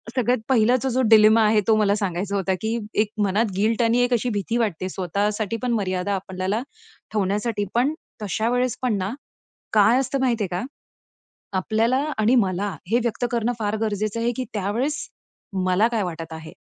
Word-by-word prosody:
सगळ्यात 250 0 +2
पहिलाचा 250 +2 +3
जो 255 +2 +1
डिलेमा 220 0 +7
आहे 210 0 +4
तो 220 - +5
मला 205 -1 +3
सांगायचा 200 0 -2
होता, 190 -1 0
की 225 +2 -1 0.2
एक 215 - -1 0.2
मनात 205 +3 +1
गिल्ट 220 +3 +1
आणि 230 +1 +3
एक 245 0 +1
अशी 240 +1 +1
भीती 220 +2 -1
वाटते 190 -5 -1
स्वतःसाठी 205 +4 -1
पण 245 - 0
मर्यादा 195 -2 -1
आपल्याला 190 +3 -2 0.5
ठेवण्यासाठी. 205 +1 -1
पण 255 +5 +2 0.3
तशा 220 +3 -1
वेळेस 250 -1 0
पण 240 -5 +1
ना, 190 0 -2 0.6
काय 220 +4 +5
असतं 270 +1 -1
माहितीये 235 -6 +1
का? 180 +1 -2 1.0
आपल्याला 225 +6 +1 0.2
आणि 220 +4 +3
मला 200 -2 +1 0.2
हे 240 - +4
व्यक्त 240 +1 -1
करणं 235 0 0
फार 210 0 -1
गरजेचं 215 0 -1
आहे, 235 +1 +1
की 255 - -3
त्यावेळेस, 225 +9 -1 0.7
मला 185 +4 +3
काय 225 -3 0
वाटत 165 -2 -6
आहे? 160 0 -9
215 Hz, 170 wpm, -23 LUFS, 200-235 Hz, 1.0 s, डिलेमा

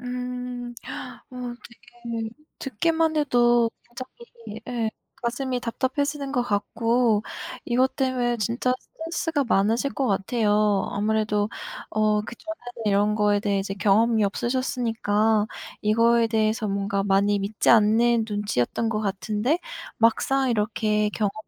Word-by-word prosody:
음. 250 -1 -5 0.6
어, 255 - -13
어떡해. 240 -2 -7 0.3
듣기만 320 +5 0
해도 240 -5 +3 0.2
갑자기 240 0 -10 0.4
예, 230 -3 -1 0.3
가슴이 250 +1 -2
답답해지는 275 +4 -2
것 245 - +1
같고, 230 +1 +1 0.4
이것 255 +2 +2
때문에 255 -3 0
진짜 235 +4 0
스트레스가 325 -2 -3
많으실 230 +4 +1
것 270 - -1
같아요. 210 0 +2
아무래도 210 0 +1 0.4
어, 215 0 +2
그전에는 245 +2 -8
이런 205 +1 +3
거에 210 -1 +2
대해 200 -2 0 0.2
경험이 220 +2 +3
없으셨으니까 225 -2 0 0.4
이거에 230 +2 +4
대해서 220 -1 +1
뭔가 200 0 -1
많이 200 +1 +2
믿지 200 +2 -1
않는 225 +1 +4
눈치였던 205 - -1
것 215 -1 -1
같은데 215 - 0 0.4
막상 260 +4 +2
이렇게 210 -1 +1
경험을 210 -2 -1
230 Hz, 275 characters per minute, -25 LUFS, 210-250 Hz, 0.6 s, 이거에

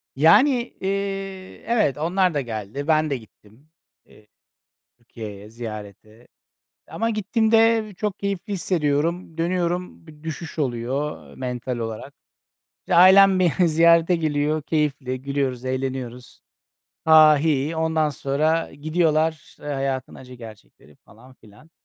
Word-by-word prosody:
Yani, 235 - +4
eee, 195 -1 -4
evet, 215 - +1
onlar 180 +3 +1
da 145 - 0
geldi, 115 +4 -6
ben 155 -1 +2
de 140 - -1
gittim, 110 +4 -20 0.4
eee, 105 - -21 0.7
Türkiye'ye 105 -3 -10
ziyarete. 110 0 -10 0.6
Ama 225 +1 -2
gittiğimde 220 +1 +2
çok 210 0 -3
keyifli 200 +1 -4
hissediyorum, 165 -2 -1
dönüyorum, 175 0 -2
bir 150 -1 -16
düşüş 160 0 -7
oluyor 135 +2 -3
mental 125 -1 -4
olarak. 115 +4 -6 0.7
İşte, - - -2
ailem 190 +2 +7
beni 180 0 +2
ziyarete 170 +2 +4
geliyor, 155 -1 -1
keyifli, 140 -5 -2
gülüyoruz, 135 -3 -2
eğleniyoruz, 130 -1 -5 0.6
"ha 160 - -1 0.2
ha, 150 - +4
hi 145 -2 0
hi" 165 - -5
ondan 160 -1 +1
sonra 155 +4 -1
gidiyorlar, 155 +1 -1
eee, - - -11
hayatın 135 -2 -3
acı 125 -1 -12
gerçekleri 110 - -14
falan 130 0 -18
filan. 110 +8 -20
150 Hz, 120 wpm, -23 LUFS, 130-175 Hz, 0.7 s, ailem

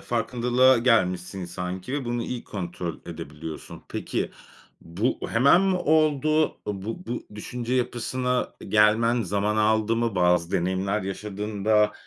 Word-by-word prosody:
farkındalığa 125 +2 +2
gelmişsin, 95 -6 +1
sanki, 90 +6 -5
ve 145 -2 -2
bunu 120 0 -2
iyi 120 0 -5
kontrol 90 -3 -5
edebiliyorsun. 80 -1 -8
Peki, - - -3 0.5
bu 95 +10 -2
hemen 140 +9 +5
mi 195 -1 +2
oldu? 155 -1 +3 0.2
Iıı, 100 -2 -4
bu 115 - -6
bu 120 - -4
düşünce 120 +3 -4
yapısına 125 +1 -1
e - - -9
gelmen 115 +3 +3
zaman 105 +2 0
aldı 110 +1 +2
mı? 115 -2 0
Bazı 90 -1 +2
deneyimler 95 +3 0
yaşadın 100 +1 -5
da 105 -1 +4
110 Hz, 135 wpm, -25 LUFS, 95-125 Hz, 0.5 s, hemen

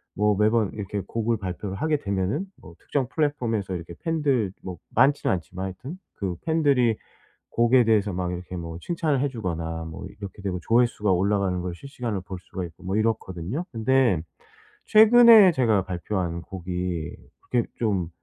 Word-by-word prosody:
뭐 105 0 +2
매번 110 0 +2
이렇게 100 -1 -4
곡을 115 0 -1
발표를 95 0 -5
하게 155 +7 0
되면은 100 - -1 0.2
뭐 85 - -13
특정 135 +5 -2
플랫폼에서 120 - -1
이렇게 85 0 -7
팬들 140 - 0
뭐 90 -2 -6 0.2
많지는 135 +1 +3
않지만 90 +1 -4
하여튼 125 - -7 0.2
그 95 -3 -3
팬들이 140 -8 +3 0.5
곡에 120 +1 +4
대해서 105 -3 +2
막 90 0 -2
이렇게 90 +1 -6
뭐 85 -1 -6
칭찬을 160 - 0
해주거나 85 - -3
뭐 80 -1 -8
이렇게 100 0 -8
되고 95 -2 -3
조회수가 115 -4 +2
올라가는 95 0 +1
걸 90 -1 -4
실시간으로 120 -3 -5
볼 95 0 -7
수가 90 0 -6
있고 85 +1 -11
뭐 95 +2 -1
이렇거든요. 110 - -2
근데 120 -6 +2 0.6
최근에 220 -2 +8
제가 115 - +2
발표한 90 -1 -3
곡이 90 -3 -4 0.3
그게 120 -2 0
좀 100 -7 0
105 Hz, 350 characters per minute, -25 LUFS, 90-125 Hz, 0.6 s, 최근에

